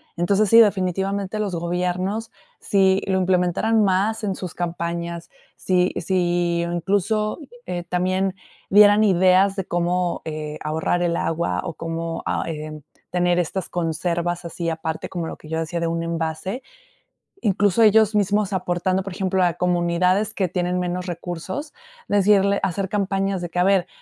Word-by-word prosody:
Entonces, 195 +4 +2
sí, 230 - +8
definitivamente, 195 -1 +1
los 205 -3 -2
gobiernos, 180 +5 -2 0.3
si 190 -1 +2
lo 190 -1 +1
implementaran 185 +4 +2
más 205 +4 +1
en 195 -2 -1
sus 180 -3 -6
campañas. 170 0 -4 0.3
Si 180 -1 +1
si 175 -1 0
incluso, 200 - 0 0.3
eh, 175 -1 -4
también 185 +2 0 0.3
dieran 205 +1 +7
ideas 190 0 +4
de 195 -2 -3
cómo, 175 0 -1
eh, 155 -1 -5
ahorrar 160 +3 0
el 170 -1 +1
agua, 155 - -1
o - - -4
cómo 165 0 -4
ay, 155 -2 -2
en 155 -1 -8 0.3
tener 175 0 +2
estas 180 +2 -3
conservas 170 +1 -2
así 170 0 -3
aparte, 160 0 -4
como 170 -3 -4
lo - - -7
que 155 - -14
yo 160 0 -1
decía 165 +1 -3
de 170 - -1
un 165 0 -1
envase. 165 +7 -3 0.8
Incluso, 205 0 +2
ellos 220 0 +5
mismos 205 0 +1
aportando, 185 0 0
por 195 - -6
ejemplo, 190 0 0
a 175 -1 +2
comunidades 180 +3 +1
que 190 - +1
tienen 180 0 -1
menos 180 0 -3
recursos, 175 - -5 0.3
decirle 200 0 +3
hacer 190 +1 -1
campañas 195 -1 -1
de 175 - -4
que: 175 - -8
"A - - +4
ver, 190 -1 +3
180 Hz, 150 wpm, -22 LUFS, 170-195 Hz, 0.8 s, sí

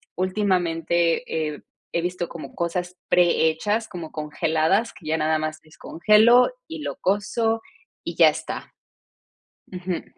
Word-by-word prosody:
últimamente, 175 -3 +1 0.3
eh, - - -11 0.3
he 170 - +1
visto 175 0 -3
como 165 - -9
cosas 180 +1 -3
prehechas, 180 +5 +2
como 170 -5 -7
congeladas, 160 +7 0
que 160 - -13
ya 160 +1 +1
nada 155 0 +1
más 155 0 -3
descongelo, 215 +10 +4 0.2
y 320 -1 -6
lo - - -4
cuezo, 225 +2 0 0.4
y - - -5
ya - - +7
está. - - -6 1.0
Ujú. 180 -1 -4
175 Hz, 125 wpm, -24 LUFS, 160-205 Hz, 1.0 s, ya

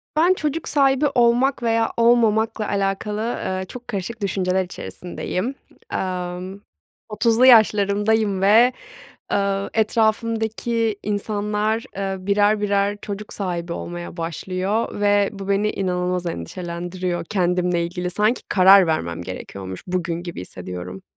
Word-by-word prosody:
Ben 345 +4 +5
çocuk 305 -2 -3
sahibi 275 0 +3
olmak 245 +2 +3
veya 230 -1 +1
olmamakla 225 -2 +3
alakalı, 200 +1 -1
ııı, 190 -5 -2
çok 245 +4 -10
karışık 215 0 -5
düşünceler 190 -1 0
içerisindeyim. 180 +7 -5 0.4
Emm, 185 +1 -4 0.5
30'lu 230 +3 +3
yaşlarımdayım 210 -3 +4
ve, 225 +6 +5 0.6
ııı, 200 0 0
etrafımdaki 225 0 0
insanlar, 210 +1 -1
ııı, 195 -1 -4
birer 205 +1 +3
birer 200 0 +1
çocuk 210 0 -6
sahibi 175 -3 -3
olmaya 175 0 -7
başlıyor 185 +6 -2
ve 205 -1 +3
bu, 195 0 -7
beni 205 +2 +2
inanılmaz 180 -1 -1
endişelendiriyor. 175 - -4
Kendimle 180 -2 +1
ilgili 180 +1 -4
sanki 210 +6 +1
karar 190 -1 +7
vermem 85 - -1
gerekiyormuş 95 +1 -7
bugün 175 -1 -2
gibi 175 - -6
hissediyorum. 90 0 -8
200 Hz, 115 wpm, -22 LUFS, 180-220 Hz, 0.6 s, karar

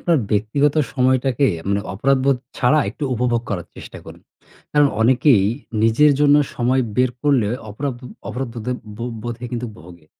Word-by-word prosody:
আপনার 170 -2 +2
ব্যক্তিগত 115 +8 +1 0.2
সময়টাকে 130 0 +2 0.2
মানে 100 0 +1
অপরাধবোধ 135 +4 +2 0.2
ছাড়া 135 +5 +3
একটু 140 +6 -6
উপভোগ 120 0 0
করার 90 -4 -3
চেষ্টা - - -10
করুন। - - -12 0.5
কারণ 145 -1 +4
অনেকেই 120 -2 +4 0.4
নিজের 120 +7 +5
জন্য 145 0 +5 0.2
সময় 130 +2 +1
বের 125 0 +3
করলে 140 -7 +2 0.2
অপরাধ 130 +4 -4 0.3
অপরাধবোদে 120 0 -4 0.2
ব - - -16 0.2
বোধে 120 +1 -6
কিন্তু 120 0 -3
ভোগে। 85 -1 -15
125 Hz, 140 wpm, -20 LUFS, 110-140 Hz, 0.5 s, নিজের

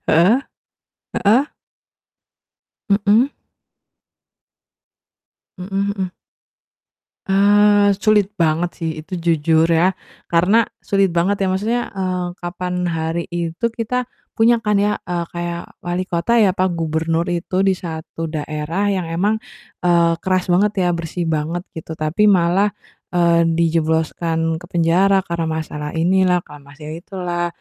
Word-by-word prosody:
Heeh, 180 +10 +4 0.9
heeh? 225 +7 +5 1.4
Mhm? 210 +6 +3 2.3
Mhm 195 +2 -2
mhm. 185 -1 -2 1.2
Eee, 205 +1 +4
sulit 210 -1 +3
banget 165 +1 +1
sih 165 -2 -2
itu, 190 - -23
jujur 165 -1 +2
ya, 170 +3 +4 0.4
karena 190 +7 +4 0.2
sulit 195 -1 +1
banget 195 +4 +1
ya. - - +2
Maksudnya, 220 +6 0
eee, 185 -2 -2
kapan 180 0 -3
hari 165 0 -2
itu 170 +5 -2
kita 245 +2 -2 0.3
punya 230 0 +4
kan 210 -1 +2
ya, 205 +1 +1
eee, 175 -1 -3
kayak 170 0 -3 0.2
walikota 180 +5 0
ya, 190 -4 +4
apa 185 -1 +1
gubernur 165 0 -1
itu 175 +2 -1
di 190 - +4
satu 165 -1 -6
daerah 155 +5 -2
yang 185 -3 -2
emang, 205 +6 +1 0.5
eee, 170 -1 +4
keras 185 -1 +1
banget 195 +4 +3
ya, - - +2
bersih 170 +1 -4
banget 160 +3 -2
gitu, 160 0 -6
tapi 155 +7 +1
malah, 190 +2 +3 0.4
eee, 170 -1 +3
dijebloskan 165 0 0
ke - - -11
penjara, 180 +3 +3
karena 170 -1 -2
masalah 150 -2 -4
inilah, 180 +2 +2
karena 145 -1 -13
masalah 150 +1 -9
itulah, 175 -3 -3
175 Hz, 120 wpm, -19 LUFS, 165-195 Hz, 2.3 s, heeh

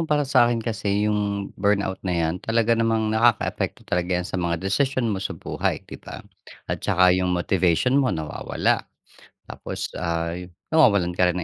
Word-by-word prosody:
para 150 -1 +2
sa'kin 120 -4 +3
kasi, 105 -2 -1
yung 100 -1 -1
burnout 100 -2 +1
na 90 -2 -2
‘yan 85 +2 -1
talaga 115 0 +1
namang 115 -1 +1
nakakaapekto 115 0 +1
talaga 90 +1 0
yan 90 - -2
sa 90 - -3
mga 85 -1 0
desisyon 120 +2 +1
mo 95 - -3
sa - - -4
buhay - - -3
‘di - - -11
ba? - - -10 0.5
At - - -4
saka 90 0 +4
yung 90 -1 +1
motivation 95 - +2
mo 130 - +1
nawawala. 80 -7 -1 0.6
Tapos - - -6
ay, 85 +2 -3 0.2
nawawalan 100 - +4
ka 90 0 +2
rin 90 - -1
100 Hz, 165 wpm, -23 LUFS, 90-115 Hz, 0.6 s, saka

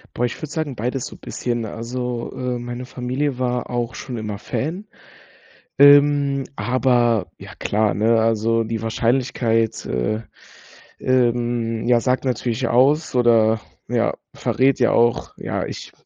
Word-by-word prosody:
Boah, 125 - +1
ich 120 - -3
würde 155 - -4
sagen, 155 -5 -3
beides 125 +3 -2
so - - -9
bisschen. 120 -2 -3
Also, 120 +2 -4
äh, 125 -1 -3
meine 120 +1 -6
Familie 130 +2 -3
war 125 -1 -1
auch 120 -1 -2
schon 125 -3 -6
immer 105 -2 -4
Fan, 170 - -4 0.9
ähm, 145 -1 +6
aber 120 -2 +1
ja - - -11
klar, 105 -2 0
ne, 110 +4 +3
also 115 +1 +2
die 115 0 -3
Wahrscheinlichkeit, 115 0 0
äh, 65 - -1 0.8
ähm, 120 -2 0
ja, 120 -1 +5
sagt 130 +2 0
natürlich 125 -1 -1
aus 140 +6 +3
oder 115 -3 +3 0.3
ja - - 0 0.2
verrät 135 +1 +1
ja 120 - +3
auch 120 0 +2
ja, - - -3
ich - - -8
120 Hz, 140 wpm, -21 LUFS, 115-130 Hz, 0.9 s, ähm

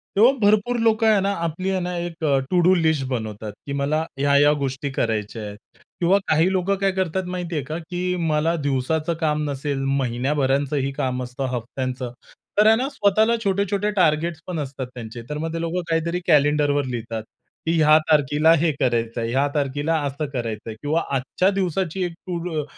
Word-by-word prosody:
तेव्हा 230 +6 +7
भरपूर 215 +4 +3
लोकं 225 0 +3
आहे 215 -2 +5
ना 200 +1 +1
आपली 170 +4 -2
आहे 190 -1 0
ना 180 0 -3
एक 170 -1 -5
अ, 140 -3 +3
टू 180 - +3
डू 180 +2 +5
लिस्ट 160 -5 +1
बनवतात, 110 -3 -4
की 140 - -4
मला 145 +3 0 0.2
ह्या-ह्या 145 +1 +5
गोष्टी 135 +1 -2
करायच्या 110 -3 -2
आहेत. 105 0 -7 0.4
किंवा 180 +3 +4
काही 160 +4 +3
लोकं 190 +1 +1
काय 195 0 +1
करतात 190 -1 -1
माहितीये 175 -4 -3
का 155 +2 -5
की 180 0 -1
मला 155 +2 +1
दिवसाचं 150 +4 0
काम 150 -2 0
नसेल 140 0 -2 0.2
महिन्याभराचंही 135 +2 0
काम 130 -1 -2
असतं 125 +2 -4
हफ्त्यांचं, 125 +1 -4 0.5
तर 210 +1 +6
आहे 220 - +7
ना 260 +2 -1
स्वतःला 215 0 +2
छोटे-छोटे 200 +1 0
टार्गेट 170 -3 +2
पण 175 -4 -3
असतात 135 -2 -5
त्यांचे, 115 0 -7
तर 150 - -3
मग 165 +1 -3
लोकं 170 +2 -2
काहीतरी 170 +2 0
कॅलेंडरवर 145 -2 +3
लिहितात 115 -3 -4 0.4
की 165 - +1
ह्या 155 0 +6
तारखेला 150 +1 +4
हे 165 -2 +3
करायचंय, 115 -2 0
ह्या 140 +3 +2
तारखेला 145 +3 0
असं 140 +3 -3
करायचंय 115 -2 -4
किंवा 155 +3 +1
आजच्या 145 +8 +1
दिवसाची 190 -1 -1
एक 175 - -3 0.2
टू 175 -1 -2
डू 160 -4 -2
155 Hz, 175 wpm, -23 LUFS, 135-180 Hz, 0.5 s, तेव्हा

